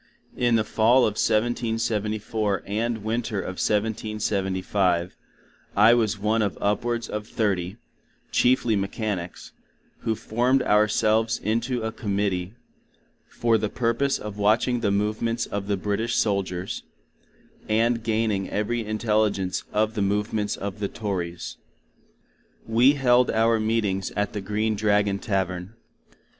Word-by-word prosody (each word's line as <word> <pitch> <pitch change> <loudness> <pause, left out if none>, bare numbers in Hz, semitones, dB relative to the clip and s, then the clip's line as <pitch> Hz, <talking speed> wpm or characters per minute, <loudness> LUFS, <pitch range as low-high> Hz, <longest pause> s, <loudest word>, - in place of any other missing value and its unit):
In 120 -1 +2
the 110 - +3
Fall 115 +4 +4
of 105 - 0
1774 110 -2 0
and 110 +2 -2
Winter 110 -1 -2
of 95 -1 -4
1775 100 -4 0 0.6
I 110 +3 +7
was 110 -3 +1
one 105 +3 +1
of 100 -3 -1
upwards 115 +2 -1
of 105 0 -5
thirty, 95 -3 -1 0.5
cheifly 120 -3 +3
mechanics, 100 -2 -3 0.5
who 115 -1 -1
formed 125 +5 +1
our 105 +1 +4
selves 110 +2 +2
in 110 +3 0
to 120 -1 -2
a 110 - -2
Committee 100 -3 -2 0.7
for 115 -2 +1
the 105 - -1
purpose 125 +5 0
of 105 -1 -7
watching 115 +4 +2
the 110 -3 0
Movements 110 +3 0
of 100 -1 -4
the 100 -1 0
British 105 +4 -1
Soldiers, 95 -3 -1 0.9
and 115 +2 +2
gaining 110 -3 0
every 115 +3 -1
intelegence 105 -3 0
of 110 +1 +1
the 105 - -2
movements 105 +1 0
of 100 +1 -5
the 100 - -1
Tories. 90 -6 -4 1.1
We 120 +5 +5
held 125 -3 +3
our 115 0 +3
meetings 110 -4 0
at 105 0 -1
the 105 - -3
Green 105 +2 -1
Dragon 105 -1 +1
Tavern. 95 -1 -2
105 Hz, 125 wpm, -25 LUFS, 100-115 Hz, 1.1 s, I